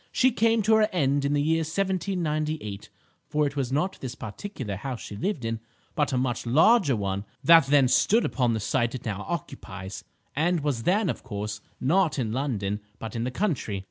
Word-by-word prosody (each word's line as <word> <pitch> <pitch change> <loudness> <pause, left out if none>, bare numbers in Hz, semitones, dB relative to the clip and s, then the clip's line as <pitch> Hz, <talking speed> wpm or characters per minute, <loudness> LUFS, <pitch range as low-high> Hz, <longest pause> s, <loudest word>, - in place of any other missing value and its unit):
She 260 0 +3
came 230 -1 +2
to 220 +2 +4
her 215 0 +3
end 140 -5 +1
in 140 - +1
the 145 0 +2
year 160 +2 +2
1798, 160 - -2 0.4
for 150 0 +2
it 140 0 -3
was 135 -3 -1
not 180 +8 -1
this 130 -2 -5
particular 115 - -6
house 130 +1 -5
she 105 - -8
lived 135 - -2
in, 115 0 -2 0.3
but 150 -3 0
a 130 - 0
much 125 -1 -1
larger 155 - +5
one 100 -1 -2 0.2
that 165 +2 +7
then 140 -2 +5
stood 220 - +3
upon 125 -3 +1
the - - -1
site 120 +3 0
it 125 - -7
now 105 -2 -3
occupies, 100 - -6 0.3
and 165 +3 +1
was 140 -5 -1
then, 205 +2 +2
of - - -2
course, 105 -3 -5 0.2
not 170 +4 +2
in 115 -5 -1
London, 110 -6 -2 0.2
but 110 0 -7
in 115 +1 -1
the - - -1
country. 125 - -1
140 Hz, 195 wpm, -26 LUFS, 115-170 Hz, 0.4 s, that